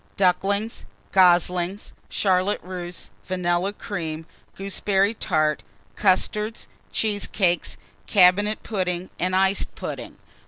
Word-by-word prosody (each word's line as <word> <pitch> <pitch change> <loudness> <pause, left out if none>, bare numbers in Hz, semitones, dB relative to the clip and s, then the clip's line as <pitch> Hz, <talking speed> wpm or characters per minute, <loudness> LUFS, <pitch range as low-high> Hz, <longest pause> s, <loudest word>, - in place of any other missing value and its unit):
Ducklings. 200 +4 +1 0.3
Goslings. 180 +1 +3 0.2
Charlotte 190 +1 +1
Russe. 180 -1 -5 0.2
Vanilla 180 +1 0
Cream. 165 -7 -5 0.3
Gooseberry 195 +1 +1
Tart. 155 - 0 0.3
Custards. 210 +3 +1 0.2
Cheesecakes. 205 -4 0 0.3
Cabinet 205 +3 +4
Pudding 185 -4 -2
and 185 +1 0
Iced 190 +1 +2
Pudding. - - -6
185 Hz, 85 wpm, -24 LUFS, 180-200 Hz, 0.3 s, Cabinet